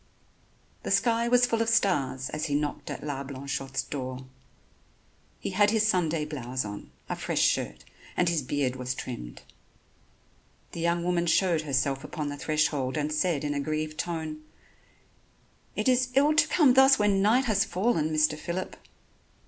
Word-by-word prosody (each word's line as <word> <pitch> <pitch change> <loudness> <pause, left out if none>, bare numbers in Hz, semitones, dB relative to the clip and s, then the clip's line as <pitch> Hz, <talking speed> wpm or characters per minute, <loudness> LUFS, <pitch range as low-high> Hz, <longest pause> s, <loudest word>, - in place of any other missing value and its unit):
The - - -5
sky 235 -1 +2
was 245 +1 +5
full 230 -2 0
of 230 - +1
stars 135 - +1
as 155 +1 -2
he 145 - -1
knocked 145 0 -2
at - - -6
La 145 -2 -3
Blanchotte's 135 0 -4
door. 130 -2 -6 1.1
He - - -4
had 205 +2 +4
his 220 0 +2
Sunday 165 -6 +1
blouse 130 -5 -4
on, 105 0 -8 0.2
a - - -3
fresh - - -1
shirt, 60 +1 0 0.3
and 180 - +2
his 170 -3 +1
beard 130 -1 -1
was 125 0 -3
trimmed. 90 - -7 1.3
The - - -7
young 170 +1 0
woman 175 -1 0
showed 170 -2 +3
herself 135 -2 -1
upon 150 -3 -4
the 145 - -6
threshold 150 -3 0
and 150 0 -1
said 155 -1 0
in 145 0 -1
a 145 - -2
grieved 155 +1 -3
tone: 160 -3 -4 1.3
"It - - -1
is 255 0 +3
ill 290 +3 +5
to 305 - +4
come 290 -7 +4
thus 265 +1 +6
when 205 -2 +2
night 235 +6 +3
has 220 -5 +2
fallen, 180 -5 0
Mr. 155 0 +2
Phillip." 170 +4 -5
155 Hz, 165 wpm, -27 LUFS, 140-200 Hz, 1.3 s, thus